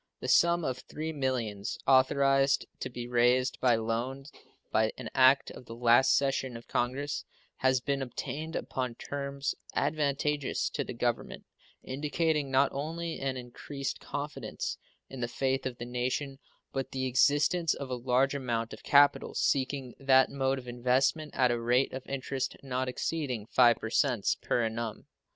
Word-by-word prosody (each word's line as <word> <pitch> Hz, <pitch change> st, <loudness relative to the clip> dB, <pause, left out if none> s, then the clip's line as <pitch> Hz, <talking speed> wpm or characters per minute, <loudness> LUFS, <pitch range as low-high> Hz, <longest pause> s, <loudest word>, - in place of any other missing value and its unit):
The -, -, -5 dB
sum 170 Hz, -1 st, +4 dB
of 130 Hz, -1 st, -4 dB
$3 160 Hz, +1 st, -4 dB
millions 120 Hz, -7 st, -2 dB
authorized 135 Hz, +1 st, +4 dB
to -, -, -4 dB
be 120 Hz, -1 st, -6 dB
raised 125 Hz, +1 st, +2 dB
by 125 Hz, -2 st, +4 dB
loan 115 Hz, +4 st, -2 dB, 0.5 s
by 110 Hz, 0 st, +2 dB
an -, -, -7 dB
act 130 Hz, +1 st, +5 dB
of 125 Hz, -, -12 dB
the 115 Hz, -, -8 dB
last 120 Hz, +2 st, +5 dB
session 135 Hz, -3 st, -1 dB
of 115 Hz, -, -14 dB
Congress 140 Hz, +5 st, -1 dB, 0.3 s
has 130 Hz, -1 st, +2 dB
been 140 Hz, +1 st, -1 dB
obtained 155 Hz, +5 st, -5 dB
upon 125 Hz, -3 st, -3 dB
terms 140 Hz, +1 st, -3 dB, 0.2 s
advantageous 145 Hz, -1 st, 0 dB
to -, -, -2 dB
the -, -, -7 dB
Government, -, -, -2 dB, 0.4 s
indicating 150 Hz, +2 st, -1 dB
not 135 Hz, +1 st, +3 dB
only 165 Hz, +4 st, -4 dB
an 135 Hz, -1 st, -2 dB
increased 135 Hz, +3 st, -5 dB
confidence 145 Hz, +1 st, -5 dB, 0.3 s
in 135 Hz, -, -9 dB
the 120 Hz, -, -1 dB
faith 130 Hz, +1 st, -1 dB
of 125 Hz, -2 st, -6 dB
the 120 Hz, -, -6 dB
nation, 130 Hz, +3 st, -2 dB, 0.3 s
but 135 Hz, -1 st, -2 dB
the 130 Hz, 0 st, -1 dB
existence 145 Hz, +6 st, +3 dB
of 135 Hz, -2 st, -6 dB
a -, -, 0 dB
large 125 Hz, +2 st, +1 dB
amount 120 Hz, -4 st, -2 dB
of -, -, -10 dB
capital 145 Hz, 0 st, +4 dB
seeking 135 Hz, -2 st, 0 dB
that 130 Hz, -1 st, +4 dB
mode 135 Hz, -1 st, 0 dB
of 125 Hz, -1 st, -9 dB
investment 130 Hz, +5 st, +1 dB
at 125 Hz, -2 st, +3 dB
a 120 Hz, -1 st, -1 dB
rate 120 Hz, +3 st, +2 dB
of 130 Hz, 0 st, -7 dB
interest 135 Hz, 0 st, -3 dB
not 130 Hz, -1 st, -2 dB
exceeding 125 Hz, -5 st, -2 dB
5% 120 Hz, 0 st, +2 dB
per 120 Hz, -, +1 dB
annum. 115 Hz, -1 st, -4 dB
130 Hz, 155 wpm, -30 LUFS, 125-140 Hz, 0.5 s, act